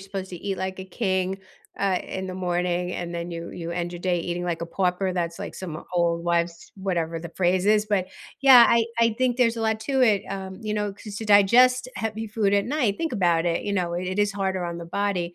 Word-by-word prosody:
supposed 195 Hz, -1 st, -6 dB
to 180 Hz, -, -6 dB
eat 195 Hz, +2 st, -4 dB
like 190 Hz, 0 st, -4 dB
a -, -, -6 dB
king, 190 Hz, -1 st, -1 dB, 0.4 s
uh, 195 Hz, -2 st, +1 dB
in 190 Hz, 0 st, -5 dB
the 185 Hz, -, -5 dB
morning, 180 Hz, -1 st, -1 dB
and 175 Hz, 0 st, -5 dB
then 170 Hz, +1 st, -4 dB
you 170 Hz, 0 st, -6 dB
you 170 Hz, -1 st, -6 dB
end 175 Hz, 0 st, -3 dB
your 175 Hz, -, -7 dB
day 180 Hz, -1 st, +1 dB
eating 175 Hz, +1 st, -3 dB
like 170 Hz, -2 st, -2 dB
a 170 Hz, -, -3 dB
pauper, 185 Hz, +1 st, 0 dB
that's, 170 Hz, -2 st, -2 dB
like, -, -, -6 dB
some 170 Hz, -4 st, -6 dB
old 170 Hz, -1 st, +1 dB
wives 170 Hz, 0 st, -1 dB
whatever 170 Hz, -4 st, -2 dB
the 170 Hz, -, -7 dB
phrase 180 Hz, 0 st, +2 dB
is, 210 Hz, +1 st, +3 dB
but 200 Hz, -3 st, +1 dB, 0.3 s
yeah, 260 Hz, -3 st, +9 dB
I 235 Hz, -1 st, +4 dB
I 230 Hz, -1 st, +3 dB
think 255 Hz, -1 st, +1 dB
there's 235 Hz, -2 st, +2 dB
a 225 Hz, -, -3 dB
lot 220 Hz, 0 st, +1 dB
to 265 Hz, +3 st, 0 dB
it, 210 Hz, -5 st, +3 dB
um, 190 Hz, -1 st, -6 dB
you 215 Hz, -1 st, -2 dB
know, 210 Hz, -1 st, -1 dB
'cause 205 Hz, +1 st, -10 dB
to 220 Hz, -, -5 dB
digest 245 Hz, +5 st, +5 dB
heavy 220 Hz, 0 st, -3 dB
food 210 Hz, -2 st, 0 dB
at 200 Hz, 0 st, +3 dB
night, 250 Hz, -8 st, 0 dB
think 325 Hz, -3 st, -2 dB
about 175 Hz, -6 st, +2 dB
it, 170 Hz, -1 st, 0 dB
you 205 Hz, -, -2 dB
know, 180 Hz, -3 st, -1 dB
it 185 Hz, +2 st, -3 dB
is 205 Hz, -1 st, +2 dB
harder 190 Hz, -2 st, -2 dB
on 170 Hz, 0 st, -4 dB
the 170 Hz, -, -7 dB
body, 180 Hz, -1 st, -2 dB
190 Hz, 240 wpm, -25 LUFS, 175-210 Hz, 0.4 s, yeah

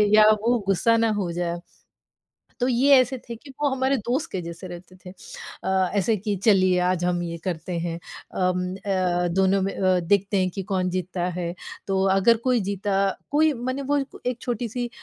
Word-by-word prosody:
या 215 Hz, 0 st, +7 dB
वो 240 Hz, +2 st, +2 dB
गुस्सा 230 Hz, +4 st, +3 dB
ना 230 Hz, 0 st, +2 dB
हो 175 Hz, -3 st, -2 dB
जाए। 175 Hz, 0 st, -2 dB, 1.0 s
तो 250 Hz, -, +1 dB
ये 260 Hz, +3 st, +4 dB
ऐसे 255 Hz, +1 st, 0 dB
थे 235 Hz, -, -4 dB
कि 275 Hz, +5 st, -15 dB
वो 295 Hz, -, +3 dB
हमारे 265 Hz, +1 st, +1 dB
दोस्त 245 Hz, +6 st, -2 dB
के 190 Hz, -, -3 dB
जैसे 170 Hz, +2 st, -8 dB
रहते 180 Hz, +1 st, -11 dB
थे -, -, -7 dB, 0.5 s
अ, 190 Hz, 0 st, +1 dB
ऐसे 205 Hz, +3 st, +2 dB
कि 205 Hz, +1 st, -2 dB
चलिए 185 Hz, -4 st, +4 dB
आज 180 Hz, -1 st, +1 dB
हम 175 Hz, -1 st, 0 dB
ये 170 Hz, -1 st, -4 dB
करते 180 Hz, -1 st, -4 dB
हैं 170 Hz, 0 st, -3 dB, 0.4 s
अम, 180 Hz, 0 st, 0 dB
अ, 185 Hz, -3 st, 0 dB
दोनों 190 Hz, 0 st, +3 dB
में 195 Hz, +1 st, -1 dB
अ, 185 Hz, -1 st, +2 dB
देखते 200 Hz, +3 st, +1 dB
हैं 185 Hz, -1 st, +2 dB
कि 195 Hz, -, -5 dB
कौन 185 Hz, -1 st, +1 dB
जीतता 180 Hz, 0 st, -2 dB
है। 175 Hz, -1 st, -3 dB, 0.3 s
तो 190 Hz, -1 st, +1 dB
अगर 225 Hz, +4 st, +4 dB
कोई 255 Hz, -2 st, +2 dB
जीता 200 Hz, 0 st, -2 dB, 0.4 s
कोई 310 Hz, +1 st, +4 dB
मने 255 Hz, +2 st, -3 dB
वो 290 Hz, -, +3 dB, 0.2 s
क -, -, -11 dB
एक 250 Hz, -1 st, -2 dB
छोटी-सी 240 Hz, 0 st, -3 dB
195 Hz, 190 wpm, -24 LUFS, 180-235 Hz, 1.0 s, या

